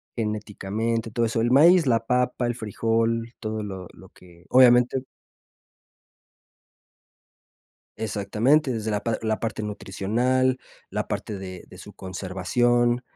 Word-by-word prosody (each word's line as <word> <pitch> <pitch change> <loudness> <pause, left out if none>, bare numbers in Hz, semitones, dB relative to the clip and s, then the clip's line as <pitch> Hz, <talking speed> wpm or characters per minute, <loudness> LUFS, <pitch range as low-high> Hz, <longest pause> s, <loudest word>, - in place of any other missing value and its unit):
genéticamente, 110 +1 -3
todo 115 0 +1
eso. 115 0 -1
El 120 +1 +1
maíz, 165 +5 +6
la 115 -3 +1
papa, 125 0 +1
el 120 - -2
frijol, 115 +1 -1
todo 110 -1 -4
lo 95 -3 -6
lo - - -16
que, 85 -1 -19
obviamente 125 0 +5 3.0
Exactamente, 110 +7 +1
desde 110 0 -3
la 105 -1 -1
par 115 -1 -1
la 110 0 -1
parte 110 -2 -3
nutricional, 120 +6 0 0.3
la - - -3
parte 105 - -4
de 95 -1 -8
de 90 - -14
su 105 +3 -12
conservación, 120 +7 0
115 Hz, 125 wpm, -24 LUFS, 105-120 Hz, 3.0 s, maíz